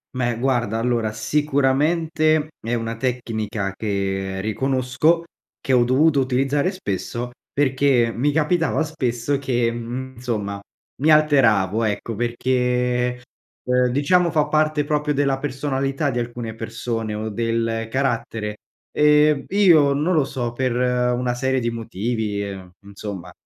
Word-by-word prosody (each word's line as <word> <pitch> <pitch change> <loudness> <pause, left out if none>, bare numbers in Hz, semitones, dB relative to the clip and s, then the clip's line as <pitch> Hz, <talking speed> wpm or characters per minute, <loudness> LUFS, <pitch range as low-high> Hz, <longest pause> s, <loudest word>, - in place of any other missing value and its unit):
Beh, 120 -2 0
guarda, 120 -4 0
allora, 115 -2 0
sicuramente 150 +6 +1
è 115 +2 -3
una 115 -1 -2
tecnica 115 -5 -3
che 95 -2 -2
riconosco, 130 - +1 0.4
che 135 - -1
ho 125 -1 +5
dovuto 140 +4 +3
utilizzare 135 +6 +1
spesso, 120 - -4 0.2
perché 130 -4 +2
mi 145 +5 +1
capitava 160 +2 +1
spesso 135 -3 -1
che, 120 -4 0
mhmm, 120 +3 -5
insomma 105 -5 -3 0.4
mi 155 +1 +4
alteravo, 115 -9 +4
ecco, 110 +1 -2
perché, 125 +1 0 0.5
uhm, 125 0 +3
diciamo 170 +7 +2
fa 150 -2 +2
parte 155 -1 +1
proprio 150 0 0
della 140 -1 +1
personalità 135 +1 -1
di 120 - -2
alcune 120 -1 -5
persone, 115 -1 -4
o 105 +1 -3
del 115 +1 -1
carattere. 115 -5 -2 0.4
Ehm, 150 -1 +4
io 170 -8 +5
non 150 +6 0
lo 155 -4 +3
so, 120 -3 -4
per 130 0 -1
una 125 0 +1
serie 130 +1 0
di 120 -1 -1
motivi, 110 -2 -3
uhm, 95 -2 -9
insomma 100 -3 -7
125 Hz, 130 wpm, -22 LUFS, 115-145 Hz, 0.5 s, ho